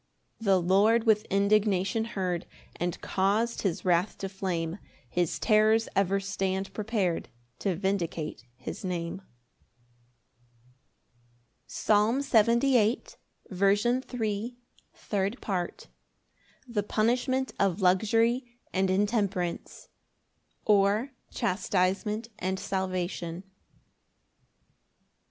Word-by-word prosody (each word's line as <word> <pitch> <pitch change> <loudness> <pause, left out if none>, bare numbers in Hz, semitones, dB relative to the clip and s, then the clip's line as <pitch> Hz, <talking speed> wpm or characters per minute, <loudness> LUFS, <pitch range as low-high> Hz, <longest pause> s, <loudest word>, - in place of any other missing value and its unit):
8 225 - -9
The 195 -2 +5
Lord 200 +6 +4
with 220 -2 +3
indignation 200 +1 +2
heard, 185 -6 -3 0.3
And 175 0 -2
caus'd 210 +5 0
his 190 -3 -2
wrath 180 +2 +2
to 195 - -4
flame 185 -2 -3 0.3
His 175 -2 -1
terrors 220 0 +3
ever 195 0 +2
stand 195 0 -2
prepar'd 205 -5 -1 0.3
To 195 -3 0
vindicate 170 - -2
his 130 +10 -7
Name. 175 0 -3 2.5
Psalm 215 +5 +2
78:3. 235 -2 +1 0.4
Third 200 +3 -2
Part. 180 -4 -3 0.8
The 230 -4 -1
punishment 250 +5 0
of 195 0 +1
luxury 225 +7 +3 0.3
and 190 0 +1
intemperance; 200 -3 -1 0.8
or, 210 +5 +3 0.2
Chastisement 195 +4 0
and 190 +1 -1
salvation. 185 -3 -3
200 Hz, 85 wpm, -28 LUFS, 185-220 Hz, 2.5 s, The